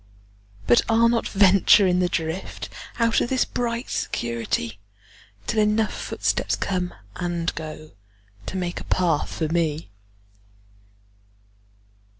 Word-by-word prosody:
But 120 - +5
I'll 230 +1 +5
not 235 -1 +1
venture 195 0 +5
in 180 -1 +2
the 180 -1 +2
driftOut 185 +7 -2
of - - -1
this 260 -1 +2
bright 235 0 -3
security, 115 -2 -2 0.7
Till 220 - 0
enough 215 +1 +2
footsteps - - -1
come 180 -2 -2 0.2
and 175 -2 -2
goTo 155 -1 -8 0.6
make 180 -2 -2
a - - -8
path 170 -5 +1
for 160 - -2
me. 160 -6 -1
180 Hz, 110 wpm, -24 LUFS, 160-215 Hz, 0.7 s, But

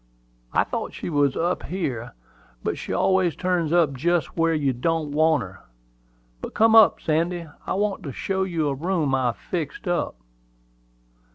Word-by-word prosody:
"I - - +3
thought - - -4
she - - -5
was 145 -3 +2
up 175 +2 0
here; 130 -11 -4 0.5
but - - -1
she - - -7
always 190 -4 +2
turns 180 -4 0
up 165 -5 +3
just 170 +5 0
where 165 -1 +2
you 140 -3 +1
don't 155 +4 -1
want 155 -2 +3
her. 95 -1 -11 0.8
But - - -7
come 225 0 +5
up, 225 -2 +7
Sandy; 170 +2 0 0.2
I - - -1
want 205 0 -1
to 140 - -4
show 190 +8 -2
you 170 -5 0
a 140 - 0
room 160 -1 -1
I've 125 -5 +1
fixed 165 -1 -5
up." 175 -1 -1
165 Hz, 165 wpm, -24 LUFS, 145-180 Hz, 0.8 s, up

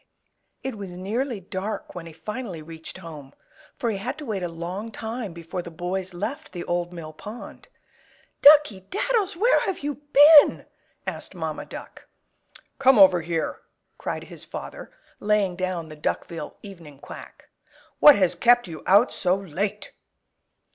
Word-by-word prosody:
It 255 -5 -5
was 195 -2 -6
nearly 210 +7 -3
dark 190 +3 -5
when 170 -2 -8
he - - -10
finally 190 -1 -6
reached 160 +2 -9
home, 155 -6 -10 0.4
for 235 - -1
he 205 - -3
had 250 +8 -4
to 305 - -8
wait 210 -6 -3
a 175 - -1
long 180 +7 -6
time 225 -2 -5
before 170 +2 -6
the 170 - -9
boys 180 +3 -4
left 235 - -5
the 175 - -5
Old 175 0 -2
Mill 165 -3 -8
Pond. 210 +9 -10 0.7
"Duckey 285 -11 +6
Daddles, 415 -2 0
where 465 +7 +4
have 380 - -3
you 290 0 -4
been?" 295 +1 +8 0.4
asked - - -6
Mamma - - -4
Duck. - - -10 0.7
"Come 265 -2 +6
over 185 -3 +7
here!" 165 -1 -2 0.4
cried - - -4
his - - -10
father, - - -8 0.3
laying 205 -3 +1
down 180 -3 -3
the 155 - -9
Duckville 165 +2 -4
"Evening 170 -8 -11
Quack." - - -12 0.5
"What 295 - +9
has 185 -3 +3
kept 240 -2 +4
you 160 -3 -8
out 205 +6 +5
so 180 0 +1
late?" 195 +3 -4
195 Hz, 155 wpm, -24 LUFS, 175-240 Hz, 0.7 s, What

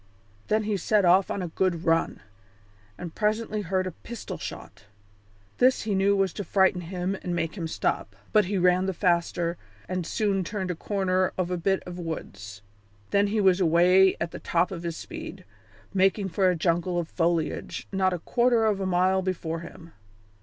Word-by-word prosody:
Then 215 0 +1
he 210 -1 -1
set 205 +2 +2
off 185 +2 +5
on 195 - -2
a - - -3
good 180 0 -1
run, 165 0 +1 0.8
and 175 -2 -7
presently 215 0 -1
heard 185 0 -1
a 185 - -3
pistol 230 +7 -8
shot. - - -9 0.7
This 255 +1 +4
he 210 -1 -1
knew 195 +1 +3
was 195 -3 +1
to 205 - -4
frighten 190 -2 +2
him 180 +2 -3
and 175 -1 -3
make 165 -2 -2
him 170 -5 -4
stop, 105 -9 -2 0.2
but 210 -2 +5
he 200 +2 -1
ran 180 +1 +3
the 190 - -2
faster 170 -1 0 0.3
and 185 -1 -2
soon 200 -3 0
turned 190 -1 -3
the - - -4
corner 185 0 0
of 180 -1 -1
a - - +1
bit 190 +3 0
of 180 0 -8
woods. 100 - -7 0.5
Then 200 0 +3
he 215 +2 0
was 190 -2 +4
away 180 +2 +5
at 170 0 -2
the - - -7
top 175 +2 0
of 175 -3 -5
his 170 -1 -4
speed, 325 -1 -8 0.5
making 195 +1 +2
for 185 +2 +2
a 180 - +1
jungle 175 +1 0
of 170 -2 -1
foliage 165 -2 -1
not 190 -1 +2
a 180 - -1
quarter 235 +5 +2
of 210 -3 +1
a 190 - -2
mile 185 +1 +2
before 170 -3 -3
him. 170 0 -12
185 Hz, 190 wpm, -26 LUFS, 170-195 Hz, 0.8 s, off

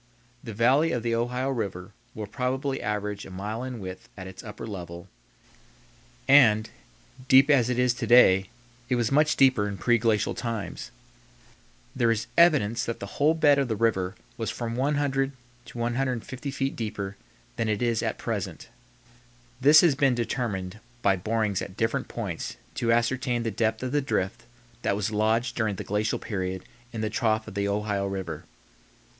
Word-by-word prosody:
The 115 -4 -7
valley 135 +8 +3
of 120 -3 -2
the 115 -1 0
Ohio 125 +3 -1
River 100 -6 -4 0.2
will 110 - -4
probably 130 +5 -2
average 105 -1 -3
a - - -10
mile 105 +5 -5
in 130 -1 -5
width 95 -2 -8
at 95 - -7
its 95 0 -10
upper 105 0 -8
level 85 -5 -7 1.2
and, 115 -6 +6 0.6
deep 135 +3 +6
as 125 -4 +4
it 125 - 0
is 125 -1 +3
to 120 -2 -4
day, 95 -5 +6 0.4
it 125 - +2
was 120 -1 0
much 150 +2 +3
deeper 130 -6 +4
in 100 -1 -5
preglacial 115 0 +2
times. 115 -4 -4 1.1
There 120 -3 +2
is 110 -1 0
evidence 135 -10 +4
that 115 - -4
the - - -5 0.2
whole 155 +3 +5
bed 145 -3 +4
of 135 - +1
the 110 - -1
river 100 -4 0 0.2
was - - -2
from 115 -1 -4
100 135 0 0 0.3
to - - -11
150 125 +2 -2
feet 135 0 -2
deeper 105 -3 -4 0.4
than 115 -2 -1
it 105 +2 0
is 115 -2 +1
at - - -2
present. - - -4 0.9
This 145 +3 +8
has 170 -5 +4
been 135 -2 +2
determined 110 -5 -3 0.2
by 100 -1 +4
borings 105 +1 -1
at 95 +1 -7
different 115 0 0
points - - -5 0.2
to 115 -1 0
ascertain 120 +1 +1
the 115 - -2
depth 110 +2 -1
of 130 - -2
the 145 +1 +2
drift 120 -3 -2 0.4
that 100 - 0
was 105 +1 -2
lodged 110 +3 +1
during 110 -3 0
the - - -6
glacial 105 +2 -1
period 95 -3 -4 0.3
in 115 - -5
the 110 -1 -2
trough 110 -2 0
of - - -8
the 100 0 -1
Ohio 100 -1 -1
River. 95 -5 -5
115 Hz, 170 wpm, -26 LUFS, 105-130 Hz, 1.2 s, This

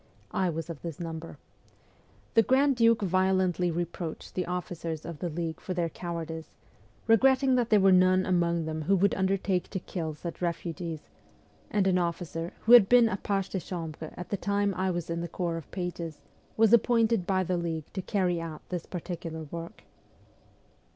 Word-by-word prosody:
I 185 -2 +1
was 165 -1 -4
of 165 -4 -7
this 165 -4 -6
number. 165 -1 -6 1.0
The 225 - +6
grand 265 +4 +3
duke 230 -2 +4
violently 185 -1 +2
reproached 170 -1 -4
the 180 -2 -2
officers 170 -3 -4
of 165 -3 -7
the 175 - -2
league 165 0 -4
for 185 - -5
their 170 -2 0
cowardice, 165 -2 -5 0.6
regretting 260 +4 +4
that 245 -2 +2
there 215 - +5
were 195 0 +5
none 185 0 +5
among 170 -2 +1
them 160 0 -3
who 190 +6 +2
would 195 +2 +3
undertake 190 -1 0
to 190 - -3
kill 160 -4 -4
such 170 +3 -7
refugees; 170 -2 -3 0.7
and 205 -2 +1
an 185 -1 +3
officer, 170 0 -3
who 225 - +1
had 235 -5 +9
been 245 -2 +6
a 190 - -2
page 195 -1 -1
de 190 - -2
chambre 165 -3 -6
at 180 - -7
the 200 - -1
time 200 0 0
I 185 +1 -1
was 175 -2 -2
in 170 0 -2
the 170 - -3
corps 170 0 -2
of 165 - -9
pages, 175 -4 -5 0.4
was 220 0 +5
appointed 230 -4 +3
by 190 -1 +2
the 180 0 -1
league 165 -3 -3
to 190 - -3
carry 180 -4 0
out 160 -2 -8
this 180 -2 -4
particular 165 -2 -5
work. 170 0 -7
180 Hz, 180 wpm, -28 LUFS, 165-195 Hz, 1.0 s, had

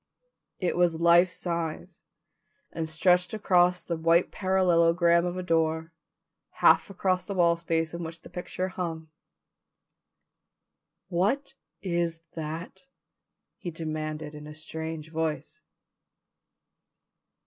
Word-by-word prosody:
It 180 - -1
was 175 -2 +2
life 170 +2 +6
size 170 0 -4 0.7
and 160 -1 -3
stretched 180 +4 +2
across 180 -3 +3
the 170 - -2
white 165 +2 +3
parallelogram 170 -2 +3
of 175 +1 -4
a 185 - -3
door, 160 -1 0 0.6
half - - +4
across 185 -1 0
the 200 +2 -5
wall 170 -2 +4
space 165 -1 -1
on 170 - -5
which 165 +1 -8
the - - -12
picture 185 +1 -4
hung. 165 -4 -5 2.0
"What 205 +12 0 0.3
is 170 -3 -1
that?" 160 - -6 0.7
he 175 - -5
demanded 155 -2 -4
in 150 0 -9
a 150 - -10
strange 160 0 -6
voice. 155 -1 -3
170 Hz, 110 wpm, -27 LUFS, 160-180 Hz, 2.0 s, life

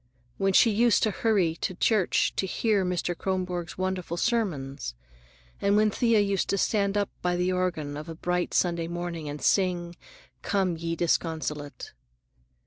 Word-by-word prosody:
When 195 0 +2
she 225 - +6
used 225 +1 +3
to 215 - +2
hurry 200 -7 +1
to 185 - -3
church 210 -1 +2
to 190 - 0
hear 210 0 +1
Mr. 180 -1 -1
Kronborg's 180 -2 -3
wonderful 185 -2 -2
sermons, 145 - -1 0.7
and 200 +1 +3
when 215 0 +4
Thea 230 0 +3
used 200 -2 0
to 200 - +1
stand 200 0 +1
up 205 -1 0
by 180 0 0
the 180 +1 +1
organ 175 -6 -1
of 155 +3 -7
a 165 - -6
bright 180 +2 -1
Sunday 170 -2 +1
morning 170 -3 -4
and 145 +1 -5
sing 175 -3 +1 0.5
"Come, 190 -4 0
Ye 165 0 -3
Disconsolate." 155 -3 -2
180 Hz, 155 wpm, -27 LUFS, 170-200 Hz, 0.7 s, she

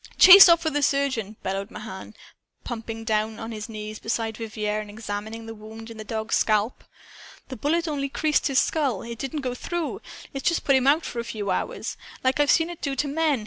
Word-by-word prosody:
"Chase 380 0 +11
off 335 0 +5
for 315 - 0
the 290 0 0
surgeon!" 260 -7 0
bellowed 195 +1 -3
Mahan, 210 -1 -9 0.5
plumping 225 -1 -6
down 215 0 -1
on 225 0 -6
his 215 +1 -6
knees 215 -1 -7
beside 225 -1 -2
Vivier 215 -2 -3
and 210 - -10
examining 215 +1 -6
the 225 - -7
wound 220 +1 -10
in 225 - -10
the 215 - -6
dog's 220 +1 -1
scalp. 215 +2 +1 0.7
"The 260 - -5
bullet 330 +8 0
only 280 -2 -2
creased 300 +2 +1
his 275 -2 0
skull! 275 -11 0
It 235 -1 -7
didn't 285 +2 -3
go 255 -2 -2
through! 340 +5 -4 0.3
It's 275 +3 +1
just 340 - -1
put 275 - +4
him 265 0 +2
out 305 +4 +4
for 240 - -5
a - - -2
few 210 -4 -4
hours, - - -3 0.3
like 260 +2 +1
I've 290 -1 +3
seen 325 +1 +3
it 345 - -10
do 275 -2 -2
to 290 +2 -1
men. 300 -2 +1
230 Hz, 215 wpm, -25 LUFS, 215-285 Hz, 0.7 s, Chase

